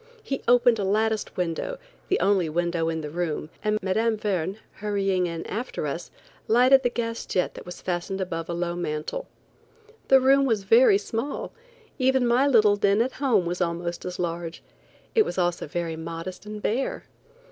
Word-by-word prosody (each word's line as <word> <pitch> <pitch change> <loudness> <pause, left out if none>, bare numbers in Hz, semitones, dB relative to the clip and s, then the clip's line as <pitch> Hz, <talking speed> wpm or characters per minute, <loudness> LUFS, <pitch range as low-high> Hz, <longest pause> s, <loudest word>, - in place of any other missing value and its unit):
He 270 - -3
opened 245 -1 +5
a - - 0
latticed 215 +2 0
window, 180 - -2 0.3
the 385 - +1
only 195 -5 +2
window 170 0 0
in 160 -1 -2
the 150 -1 -6
room, 165 -2 -3
and 215 0 +1
Mme. 220 +4 +1
Verne, 195 -3 -2 0.2
hurrying 195 -3 0
in 165 -1 -5
after 230 -7 -4
us, 165 +4 -4 0.4
lighted 255 +4 +6
the 245 - +1
gas 230 -1 -3
jet 180 - 0
that - - -11
was 180 - -9
fastened 180 +2 -2
above 165 -3 -3
a - - -1
low 175 0 -2
mantel. 170 - -3 0.8
The 270 - +7
room 275 +1 +4
was 225 -6 +1
very 225 +1 +6
small; 225 +7 -4 0.5
even 260 -1 +3
my 245 +4 +3
little 215 -6 +5
den 200 0 +3
at 245 +3 +1
home 225 -10 +3
was 175 +2 -3
almost 170 0 -2
as 180 0 -5
large. 170 -1 -4 0.5
It 440 - +5
was - - -5
also 175 -3 0
very 165 +1 -3
modest 165 +5 -7
and 210 0 -7
bare. 250 +5 -1
195 Hz, 175 wpm, -25 LUFS, 170-230 Hz, 0.8 s, The